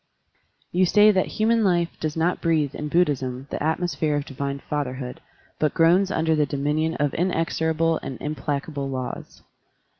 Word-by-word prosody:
You 180 +1 +3
say 210 +3 +6
that 190 -2 +1
"human 225 +1 +3
life 175 -3 +2
does 155 0 -3
not 170 +3 +1
breathe, 155 -4 +1
in 150 - -4
Buddhism, 135 -6 0
the - - -3
atmosphere 155 -1 0
of 145 -1 -2
divine 140 +1 -4
father 140 -2 -3
hood, 125 -1 -7 0.4
but 155 - +1
groans 175 +4 +4
under 160 -3 +1
the 150 -1 +2
dominion 150 +3 -1
of 145 -2 0
inex 165 -1 -1
orable 160 0 +1
and 130 - -6
implacable 145 -1 -3
laws. 130 -1 -6
155 Hz, 160 wpm, -24 LUFS, 140-170 Hz, 0.4 s, say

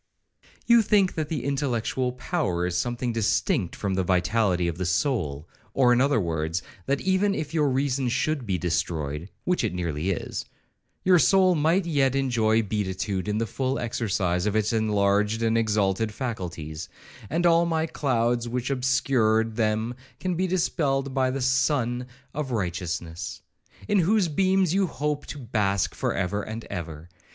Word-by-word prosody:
'You 235 -1 +6
think 200 -3 +3
that 155 -2 -3
the 150 -6 -2
intellectual 130 -2 -1
power 125 - -1
is 90 -1 -2
something 120 +4 -1
distinct 115 - 0
from 100 -2 -2
the 95 0 +1
vitality 90 0 +1
of 85 +1 -3
the 90 - -1
soul, 85 - -1 0.3
or, 125 -2 +5
in 120 - +3
other 140 -3 +3
words, 80 -1 -2 0.2
that 140 0 0
if - - -10
even 195 +1 +2
your 150 -1 0
reason 135 -1 0
should 135 +1 -1
be 95 -2 0
destroyed, 80 -1 -2
(which 180 0 0
it 90 - -1
nearly 85 -1 -2
is), 95 - -3 0.6
your 180 -1 +5
soul 190 +1 +5
might 165 +4 +2
yet 140 -5 +2
enjoy 115 -5 +2
beatitude 100 -1 -2
in 105 0 0
the 115 - 0
full 130 +5 -2
exercise 95 -6 -1
of 105 - 0
its 110 +1 +1
enlarged 105 0 +1
and 115 0 +2
exalted 105 -1 +1
faculties, 90 - -5 0.4
and 170 +3 0
all 170 0 +5
the 160 -1 0
clouds 120 -3 0
which 125 +2 -2
obscured 120 -4 +2
them 110 +1 0 0.4
be 185 +2 0
dispelled 140 -6 0
by 130 -1 +2
the 135 +1 -3
Sun 130 -2 +1 0.3
of 150 -2 -3
Righteousness, 90 -5 -4 0.4
in 205 -1 +3
whose 195 +2 +3
beams 190 +1 +2
you 195 0 +2
hope 150 -2 -3
to - - -6
bask 105 -6 0
for - - -1
ever 95 +2 -1
and 110 +2 -6
ever. 80 -4 -6
115 Hz, 160 wpm, -26 LUFS, 95-145 Hz, 0.6 s, You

